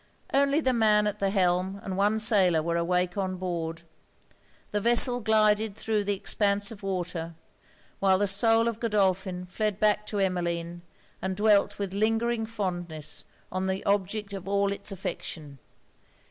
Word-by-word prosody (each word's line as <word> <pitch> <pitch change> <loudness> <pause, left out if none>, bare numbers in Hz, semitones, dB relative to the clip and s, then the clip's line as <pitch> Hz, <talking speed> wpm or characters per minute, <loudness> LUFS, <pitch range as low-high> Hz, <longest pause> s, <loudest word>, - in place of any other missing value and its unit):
Only 280 +2 +3
the 260 -3 +1
man 215 -2 +3
at 210 - -2
the 195 - +1
helm 190 0 0
and 190 - -4
one 205 +3 +1
sailor 190 -7 +3
were 170 +1 -1
awake 180 +2 0
on 185 -1 -2
board. 170 -3 -4 0.9
The 210 - -1
vessel 240 +2 +3
glided 215 -1 +2
thro' 220 -1 -1
the 205 0 -1
expanse 200 +2 +2
of 215 - -10
water; 180 -4 -4 0.6
while 190 -1 +3
the 205 - +1
soul 225 +4 +3
of 230 -1 -3
Godolphin 190 -4 0
fled 210 +2 -2
back 210 0 +2
to 210 - -3
Emmeline, 175 -3 -2 0.4
and 190 0 -2
dwelt 205 0 +3
with 200 -2 -4
lingering 225 +2 0
fondness 175 -8 -3 0.3
on 185 +1 -2
the 190 0 -3
object 200 +1 -1
of 195 -1 -7
all 200 0 +1
it's 200 +1 0
affection. 155 -6 -6
200 Hz, 155 wpm, -27 LUFS, 180-215 Hz, 0.9 s, Only